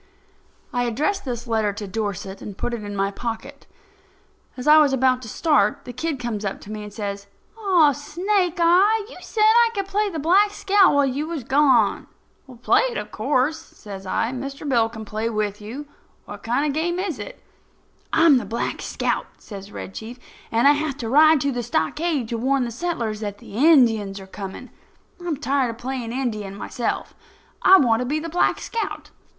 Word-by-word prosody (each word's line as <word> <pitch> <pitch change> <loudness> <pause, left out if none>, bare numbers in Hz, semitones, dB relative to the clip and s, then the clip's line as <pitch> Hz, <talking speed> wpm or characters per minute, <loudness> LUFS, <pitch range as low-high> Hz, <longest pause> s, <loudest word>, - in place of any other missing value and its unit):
I 245 0 0
addressed 305 - -1
this 240 -2 -4
letter 220 -3 0
to 205 0 -6
Dorset, 200 -2 -4
and 200 -2 -8
put 240 - -3
it 230 -3 -4
in 205 0 -6
my 195 0 0
pocket. 240 +6 -6 0.9
As 250 - -6
I 305 +1 +8
was 290 -3 +4
about 260 -1 +2
to 225 - -8
start, 310 +6 +1
the 245 - -7
kid 310 +4 -2
comes 235 -4 -4
up 195 -1 -3
to 205 - -10
me 215 0 -5
and 210 0 -8
says: 200 -1 -5 0.3
"Aw, 370 -9 +4
Snake 355 +6 -1
eye, 390 +6 +4
you - - -11
said 430 - -1
I 460 +2 +6
could 395 -1 -1
play 410 +2 0
the 335 - -5
Black 365 +7 +4
Scout 395 -5 +4
while 285 -1 +4
you 275 +4 -2
was 325 -6 -4
gone." 265 -5 +3 0.6
"Play - - +4
it, 475 - -5
of - - -5
course," 295 +3 0
says 195 -2 -11
I. 225 +5 0
"Mr. 275 +3 -6
Bill 235 -4 +2
will 220 -1 -8
play 215 +2 -3
with 210 -2 -2
you. 245 +8 -7 0.4
What - - -9
kind 245 +6 0
of 295 - +1
a 310 +3 -1
game 345 +1 -1
is 365 -6 -3
it?" - - -8 0.7
"I'm 320 -4 +5
the - - -6
Black 230 - -3
Scout," - - -2
says 200 -1 -10
Red 195 - -8
Chief, 230 +3 -8 0.3
"and 230 +4 +4
I - - +8
have 295 -2 -1
to 230 - -4
ride 310 +3 +6
to 280 - 0
the 245 -2 -2
stockade 245 - -1
to 230 - -3
warn 265 +2 +1
the 235 - -3
settlers 235 -6 -3
that 205 -2 -5
the - - -14
Indians 230 -8 +4
are 190 - -10
coming. 195 0 -8 0.5
I'm 335 -4 -2
tired 275 -3 0
of 230 - -6
playing 245 -1 -4
Indian 215 -6 -3
myself. 235 +3 -3 0.5
I 385 - +8
want 230 -8 +3
to 250 - -1
be 295 +4 0
the 330 +2 -5
Black 350 +2 +2
Scout." 460 - -5
255 Hz, 200 wpm, -23 LUFS, 220-315 Hz, 0.9 s, I